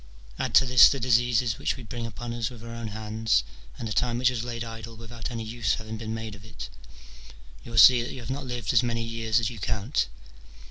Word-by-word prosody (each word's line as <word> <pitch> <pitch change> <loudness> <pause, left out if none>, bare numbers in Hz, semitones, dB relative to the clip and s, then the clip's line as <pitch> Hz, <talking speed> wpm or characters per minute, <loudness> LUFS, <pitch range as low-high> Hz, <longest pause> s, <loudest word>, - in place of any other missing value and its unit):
Add - - 0
to 135 - +7
this 125 -2 +8
the 140 - -1
diseases 120 -2 +2
which - - -1
we 130 - -9
bring 115 +2 -5
upon 115 +2 -6
us 115 -2 -2
with 120 -3 -12
our 115 0 -8
own 115 -1 -5
hands, 110 - 0 0.3
and 115 - -5
the 105 - -2
time 120 +1 +1
which 125 +1 +4
has 120 -3 -3
laid 120 -1 -4
idle 115 0 -8
without 115 +1 -7
any 115 -3 -4
use 110 -2 -1
having 110 0 -7
been 110 0 -6
made 110 -1 -6
of 100 -1 -12
it; - - -9 0.9
you - - -11
will 115 - -5
see 120 +4 +9
that 120 - -5
you 130 - -7
have 120 +2 -6
not 135 0 -4
lived 120 -4 -2
as - - +6
many 120 -2 -1
years 115 -1 0
as 115 0 -1
you 115 - -9
count. 105 - -1
115 Hz, 240 wpm, -27 LUFS, 110-120 Hz, 0.9 s, see